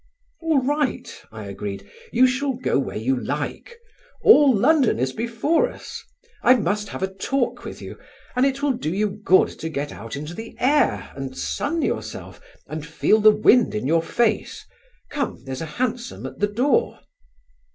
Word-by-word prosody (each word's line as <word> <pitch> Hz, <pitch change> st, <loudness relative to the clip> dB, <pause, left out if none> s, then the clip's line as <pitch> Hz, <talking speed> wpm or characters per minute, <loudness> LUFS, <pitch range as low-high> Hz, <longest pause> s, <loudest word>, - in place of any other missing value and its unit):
"All 320 Hz, -4 st, +2 dB
right," 275 Hz, -2 st, 0 dB, 0.2 s
I 110 Hz, -1 st, -8 dB
agreed, 100 Hz, 0 st, -6 dB, 0.2 s
"you 250 Hz, +2 st, +5 dB
shall 265 Hz, +2 st, 0 dB
go 245 Hz, -, 0 dB
where 135 Hz, -, -3 dB
you 125 Hz, +5 st, 0 dB
like. 465 Hz, -, -4 dB, 0.5 s
All 295 Hz, -10 st, +7 dB
London 260 Hz, -, +3 dB
is 130 Hz, +2 st, -1 dB
before 235 Hz, +8 st, +1 dB
us. -, -, -9 dB, 0.4 s
I 250 Hz, -, +6 dB
must 210 Hz, -3 st, -1 dB
have -, -, -5 dB
a 190 Hz, 0 st, -2 dB
talk 245 Hz, +6 st, -1 dB
with -, -, -8 dB
you, -, -, -9 dB, 0.4 s
and 250 Hz, -, +3 dB
it 275 Hz, +1 st, 0 dB
will 290 Hz, -, +3 dB
do 235 Hz, -10 st, -3 dB
you 205 Hz, +3 st, 0 dB
good 185 Hz, -1 st, +5 dB
to 160 Hz, -, -4 dB
get 145 Hz, -1 st, -4 dB
out 115 Hz, +2 st, -8 dB
into 150 Hz, +4 st, -6 dB
the 225 Hz, +5 st, -8 dB
air, 290 Hz, +4 st, +2 dB
and 135 Hz, -1 st, -6 dB
sun 325 Hz, +3 st, -2 dB
yourself -, -, -4 dB, 0.2 s
and 155 Hz, 0 st, -6 dB
feel 165 Hz, +7 st, +2 dB
the 215 Hz, -, +8 dB
wind 215 Hz, +3 st, +4 dB
in 105 Hz, -, -2 dB
your 165 Hz, +4 st, +3 dB
face. 220 Hz, +6 st, -1 dB, 0.5 s
Come, 285 Hz, -3 st, -3 dB
there's 130 Hz, -1 st, -5 dB
a 165 Hz, -, -4 dB
hansom 240 Hz, -1 st, -3 dB
at -, -, -8 dB
the 205 Hz, -, +2 dB
door." 260 Hz, -, +1 dB
220 Hz, 170 wpm, -23 LUFS, -, 0.5 s, the